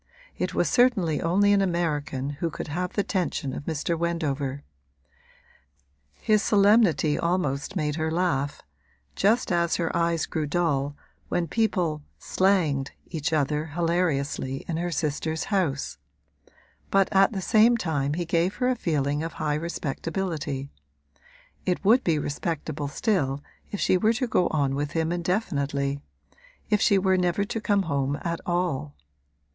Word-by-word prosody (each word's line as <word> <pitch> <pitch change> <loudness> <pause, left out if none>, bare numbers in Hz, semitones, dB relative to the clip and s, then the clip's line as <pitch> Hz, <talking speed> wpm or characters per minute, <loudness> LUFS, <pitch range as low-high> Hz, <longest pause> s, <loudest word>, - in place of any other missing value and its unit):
It - - -3
was - - +2
certainly 210 - +3
only 200 +5 +3
an 200 - +4
American 150 -7 -1
who 170 - +1
could 155 - -6
have 180 +4 -3
the 205 - +1
tension 170 -8 -2
of 145 - -6
Mr. 160 +1 -1
Wendover; 145 -5 -2 1.5
his 215 - +2
solemnity 200 -8 +4
almost 170 -1 -1
made 150 -3 -1
her 160 0 0
laugh, 160 -5 -1 0.5
just 220 +2 +2
as 170 -1 +2
her 170 -2 -1
eyes 170 -1 +1
grew 155 -2 -2
dull 145 -3 0 0.3
when 170 -1 0
people 175 -6 0 0.2
'slanged' 165 -8 +1 0.2
each 160 -2 -3
other 150 0 +1
hilariously 155 -5 -1
in 165 - -2
her 175 +1 -1
sister's 160 0 -2
house; 140 - 0 0.9
but 195 -1 +4
at 195 +1 +5
the 200 - -3
same 225 +4 +4
time 145 -7 -1
he 175 0 -2
gave 170 +3 +1
her 250 0 +1
a 255 - +2
feeling 145 - 0
of 165 +1 -4
high 150 -1 -1
respectability. 155 -2 -3 0.9
It 180 +2 -1
would 235 +5 +5
be 165 -3 +2
respectable 150 0 -3
still 145 - 0 0.3
if 205 - -5
she 185 - +3
were 220 +4 +3
to 245 +3 -1
go 180 -7 +2
on 140 -3 0
with 145 +1 -2
him 160 0 0
indefinitely 140 -7 -1 0.7
if 210 - +3
she 200 - +4
never 185 -1 +2
were - - +1
to 225 +2 -4
come 205 -2 +2
home 140 -3 -1
at 170 0 -2
all. 175 - -1
165 Hz, 145 wpm, -26 LUFS, 145-185 Hz, 1.5 s, at